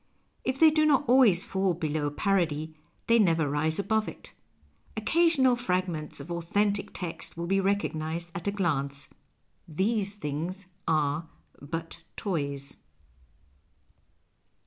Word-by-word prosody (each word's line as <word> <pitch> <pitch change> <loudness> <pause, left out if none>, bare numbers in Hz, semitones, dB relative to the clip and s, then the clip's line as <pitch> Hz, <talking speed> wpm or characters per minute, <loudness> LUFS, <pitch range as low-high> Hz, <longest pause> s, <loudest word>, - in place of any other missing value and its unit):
If 260 +1 -1
they 320 -1 +8
do 310 0 +3
not 290 -1 +3
always 235 -8 +5
fall 190 -2 0
below 155 -2 -1
jiarody, 160 -2 0 0.3
they 230 0 +4
never 165 -7 +3
rise 150 +3 0
above 215 +2 +1
it. - - -10 0.6
Occasional 270 +1 +3
fragments 180 -10 -2
of 145 +5 -8
authentic 200 +4 0
text 170 -2 -5
will 170 - -3
be 195 +3 +2
recognized 170 -4 -1
at 170 +2 -5
a - - +2
glance. 145 -8 -2 0.3
" - - -44 0.2
These 205 -2 0
Things 170 +3 -4 0.2
are 155 +1 +1 0.3
but 165 +3 -6 0.2
Toves." 140 -8 -3
175 Hz, 125 wpm, -28 LUFS, 155-205 Hz, 0.6 s, they